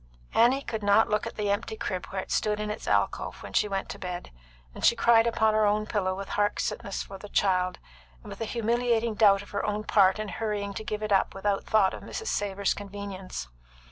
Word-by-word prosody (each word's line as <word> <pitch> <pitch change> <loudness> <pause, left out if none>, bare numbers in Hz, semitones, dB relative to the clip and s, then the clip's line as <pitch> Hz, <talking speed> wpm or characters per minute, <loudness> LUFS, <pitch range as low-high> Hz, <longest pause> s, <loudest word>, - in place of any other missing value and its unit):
Annie 255 +4 +4
could 220 -4 -4
not 205 +2 +4
look 210 - 0
at - - -7
the 205 -1 0
empty 220 +2 -2
crib 185 -4 -3
where 190 -1 -4
it - - -12
stood 210 0 +1
in 210 0 -2
its 210 - -7
alcove - - 0
when - - -9
she - - +3
went 195 -1 -2
to - - -7
bed; 180 -1 -6 0.4
and - - -10
she - - +6
cried 230 0 +5
upon 220 -2 +2
her 215 0 +3
own 210 +1 +1
pillow 190 -4 -1
with 195 0 -6
heart 205 0 0
sickness 200 - -3
for 195 -1 -10
the 205 - -10
child, 185 -2 +1 0.5
and - - -10
with - - -9
a - - 0
humiliating 235 0 0
doubt 205 -2 +5
of - - -15
her 200 - -2
own 210 0 -1
part 195 -2 +4
in 215 0 -4
hurrying 205 -2 -3
to 220 - -5
give 215 0 -4
it 210 - -3
up 195 -1 +2
without 195 0 -1
thought 205 -3 +3
of - - -7
Mrs. 445 - -5
Savor's 200 -1 0
convenience. 200 - -7
205 Hz, 230 wpm, -27 LUFS, 195-220 Hz, 0.5 s, she